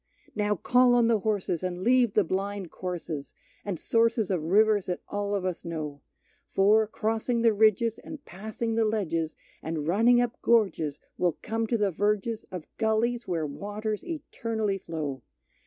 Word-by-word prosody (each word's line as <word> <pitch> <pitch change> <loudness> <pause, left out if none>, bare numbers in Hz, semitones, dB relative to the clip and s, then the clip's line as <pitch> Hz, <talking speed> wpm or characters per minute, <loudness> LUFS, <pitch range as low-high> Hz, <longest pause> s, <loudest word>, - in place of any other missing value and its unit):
Now 210 0 +1
call 245 +6 +4
on 240 -1 +4
the 225 -2 +3
horses, 200 -5 -1
and 180 0 -3
leave 245 -2 +3
the 210 - +5
blind 195 0 -3
courses 170 -5 -5 0.3
And 195 -5 -4
sources 230 -3 +2
of 180 -4 0
rivers 205 +4 +3
that 180 - -3
all 205 0 -1
of 190 -2 -2
us 185 -2 -3
know; 155 -4 -5 0.5
For, 210 +3 +4
crossing 225 +2 -1
the 230 -2 +5
ridges, 220 +1 +3
and 300 -2 -10
passing 220 +4 -4
the 225 0 +2
ledges, 165 -7 -1 0.3
And 160 -2 -3
running 230 +7 +4
up 245 -1 -1
gorges, 195 -11 +2 0.2
we'll 175 -3 +1
come 225 0 -1
to 235 - +1
the 205 -2 +1
verges 210 +4 -1
Of 180 -4 -6
gullies 230 +2 0
where 165 -3 -1
waters 205 +7 -4
eternally 225 - -3
flow. 150 -7 -4
210 Hz, 160 wpm, -27 LUFS, 180-225 Hz, 0.5 s, the